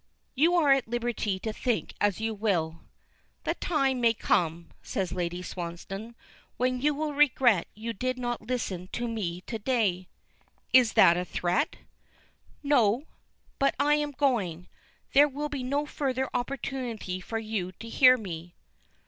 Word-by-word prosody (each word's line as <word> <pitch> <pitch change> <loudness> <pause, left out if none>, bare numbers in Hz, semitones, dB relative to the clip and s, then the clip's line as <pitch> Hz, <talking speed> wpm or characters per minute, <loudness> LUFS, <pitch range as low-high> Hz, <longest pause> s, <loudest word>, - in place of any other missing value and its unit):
"You 325 +6 +3
are 305 -5 +4
at 270 -3 +3
liberty 235 -4 -1
to 220 - -3
think 240 -1 -1
as 205 -2 +2
you 220 0 -1
will." 175 -7 -1 0.6
"The - - 0
time 275 -6 0
may 230 -1 +4
come," 170 -4 0
says 190 -3 -3
Lady 175 0 -3
Swansdown, 185 +6 -6 0.4
"when 255 0 0
you 295 +1 +2
will 300 0 -2
regret 260 - +4
you 225 +2 -4
did 255 +4 -2
not 240 -1 -3
listen 215 -6 -3
to 240 0 -2
me 185 -6 -3
to 225 +4 -6
day." 205 -6 0 0.7
"Is 250 -3 +6
that 170 +1 +6
a 180 - 0
threat?" 180 - 0 0.9
"No; 255 -2 +3 0.5
but 275 - +2
I 295 +1 +4
am 295 0 +1
going. 230 - 0 0.5
There 290 +2 +7
will 295 +2 -4
be 285 -3 -4
no 280 +4 -1
further 265 -3 -2
opportunity 245 -7 -3
for 225 +4 -4
you 215 -5 -3
to 230 - -10
hear 255 +2 +6
me." 175 -5 -7
230 Hz, 150 wpm, -28 LUFS, 185-265 Hz, 0.9 s, There